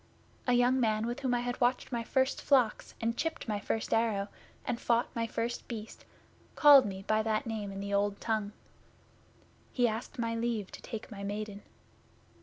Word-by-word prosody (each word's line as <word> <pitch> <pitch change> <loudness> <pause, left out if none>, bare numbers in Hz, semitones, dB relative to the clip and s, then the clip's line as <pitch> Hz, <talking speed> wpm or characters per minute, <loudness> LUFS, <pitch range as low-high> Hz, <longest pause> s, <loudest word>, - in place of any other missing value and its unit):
A 250 - +4
young 245 +2 +4
man 220 -2 +1
with 240 +3 -3
whom 260 -3 +1
I 240 - 0
had 245 +1 -3
watched 245 +2 +1
my 235 -2 -1
first 265 +3 +1
flocks, 255 -6 +2
and 230 +1 0
chipped 325 +1 -3
my 210 -2 -1
first 220 +2 -2
arrow, 215 -3 +1 0.4
and 240 - -2
fought 235 +2 +1
my 230 -1 0
first 230 +2 -3
Beast, 225 -2 -7 0.5
called 285 -5 +8
me 190 -1 -6
by 215 +2 +2
that 215 -1 0
name 215 -3 -4
in 195 - -6
the 200 0 -4
Old 200 0 +1
Tongue. 215 -2 -1 1.2
He 245 -2 +3
asked 230 +5 -4
my 230 -1 -1
leave 230 -3 -2
to - - -10
take 225 0 -7
my 200 -2 -7
Maiden. 205 0 -4
230 Hz, 185 wpm, -31 LUFS, 210-245 Hz, 1.2 s, called